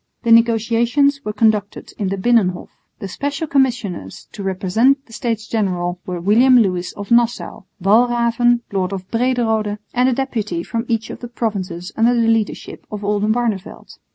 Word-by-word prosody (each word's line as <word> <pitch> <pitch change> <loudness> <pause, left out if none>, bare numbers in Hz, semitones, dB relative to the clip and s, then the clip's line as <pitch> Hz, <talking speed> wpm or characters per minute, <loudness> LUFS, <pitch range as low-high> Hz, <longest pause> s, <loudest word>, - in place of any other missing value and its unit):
The 235 - +1
negotiations 235 +5 +3
were 210 - -3
conducted 210 -2 0
in 200 - -1
the 195 - -2
Binnenhof. 190 -4 +1 0.3
The 195 - -6
Special 285 - -3
Commissioners 245 - -1
to 205 - -8
represent 210 +9 +1
the 225 - -17
States 225 -3 -3
General 180 -5 -1
were 180 -1 -3
William 235 +8 +5
Lewis 180 -5 +1
of 205 +1 -9
Nassau, 240 0 +1
Walraven, 235 +3 +3
lord 190 -1 -1
of 190 -1 -6
Brederode, 230 -4 0 0.2
and 250 +1 +3
a - - +1
deputy 220 -9 -2
from 230 +4 -3
each 225 -2 -2
of - - -8
the 240 - -7
provinces 200 -7 -4
under 235 +2 +3
the 230 -1 +2
leadership 225 -2 -2
of 210 -1 -6
Oldenbarneveldt. 210 0 -2
225 Hz, 155 wpm, -19 LUFS, 195-240 Hz, 0.3 s, William